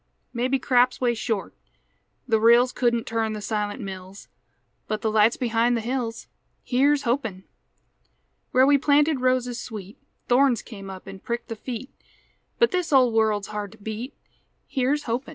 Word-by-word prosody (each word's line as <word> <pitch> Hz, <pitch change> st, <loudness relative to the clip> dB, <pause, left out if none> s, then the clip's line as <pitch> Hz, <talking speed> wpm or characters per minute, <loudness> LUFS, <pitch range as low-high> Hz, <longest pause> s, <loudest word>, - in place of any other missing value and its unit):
Maybe 255 Hz, +2 st, +1 dB
craps 250 Hz, -1 st, +2 dB
way 245 Hz, -2 st, +2 dB
short; 225 Hz, -3 st, -3 dB, 0.7 s
the 225 Hz, -3 st, +3 dB
rills 235 Hz, +3 st, +5 dB
Couldn't 235 Hz, -2 st, 0 dB
turn 225 Hz, -1 st, -1 dB
the 215 Hz, -, -5 dB
silent 210 Hz, +2 st, -3 dB
mills; 190 Hz, -1 st, -9 dB, 0.6 s
But 215 Hz, 0 st, -3 dB
the 220 Hz, -, +1 dB
light's 215 Hz, +2 st, +4 dB
behind 235 Hz, 0 st, +1 dB
the -, -, -2 dB
hills, 235 Hz, -1 st, -3 dB, 0.4 s
Here's 280 Hz, +3 st, +2 dB
hopin'! 235 Hz, -7 st, -2 dB, 1.1 s
Where 255 Hz, +1 st, +4 dB
we 285 Hz, 0 st, +5 dB
planted 290 Hz, 0 st, +3 dB
roses 250 Hz, -1 st, 0 dB
sweet 210 Hz, -3 st, -9 dB, 0.3 s
Thorns 250 Hz, -1 st, +3 dB
come 195 Hz, -4 st, -10 dB
up 190 Hz, 0 st, -9 dB
an' 195 Hz, 0 st, -9 dB
pricked 235 Hz, +4 st, -4 dB
the 225 Hz, -, -4 dB
feet; 245 Hz, +3 st, -7 dB, 0.7 s
But 470 Hz, -, +3 dB
this 360 Hz, -3 st, -1 dB
old 255 Hz, -4 st, +5 dB
world's 215 Hz, -2 st, +1 dB
hard 210 Hz, -2 st, -5 dB
to -, -, -16 dB
beat, 220 Hz, +5 st, -6 dB, 0.5 s
Here's 280 Hz, +2 st, 0 dB
hopin'! 245 Hz, +2 st, -3 dB
235 Hz, 155 wpm, -24 LUFS, 215-255 Hz, 1.1 s, rills